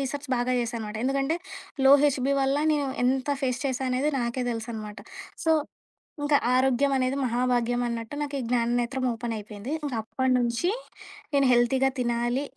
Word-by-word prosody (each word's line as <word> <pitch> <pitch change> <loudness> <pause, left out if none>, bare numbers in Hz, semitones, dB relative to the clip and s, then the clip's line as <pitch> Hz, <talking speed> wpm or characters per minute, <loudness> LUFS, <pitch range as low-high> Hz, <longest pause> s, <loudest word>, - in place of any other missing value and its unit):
Research 280 +1 -4
బాగా 245 +1 0
చేశానమాట. 225 -3 -4
ఎందుకంటే 275 +4 +1 0.5
లో 270 - +9
హెచ్‌బి 275 -1 +2
వల్ల 270 +1 +2 0.2
నేను 285 -2 0 0.2
ఎంత 260 +2 +1
ఫేస్ 255 -1 0
చేశా 265 0 -2
అనేది 260 +4 +1
నాకే 240 +1 -2
తెలుసనమాట. 220 -2 -6 0.5
సో, 320 - +5 0.7
ఇంకా 290 0 +4 0.2
ఆరోగ్యం 265 +2 +3
అనేది 255 +1 0
మహాభాగ్యం 245 0 +1
అన్నట్టు 230 +2 -4
నాకు 290 -1 -4
ఈ - - -2
జ్ఞాననేత్రం 245 +2 0
ఓపెన్ 235 0 -3
అయిపోయింది. 210 +3 -7
ఇంక 285 - -3
అప్పటినుంచి 250 - +1 0.6
నేను 275 -1 +4
హెల్తీగా 255 +2 +3
తినాలి. 240 +1 0
250 Hz, 145 wpm, -26 LUFS, 235-270 Hz, 0.7 s, లో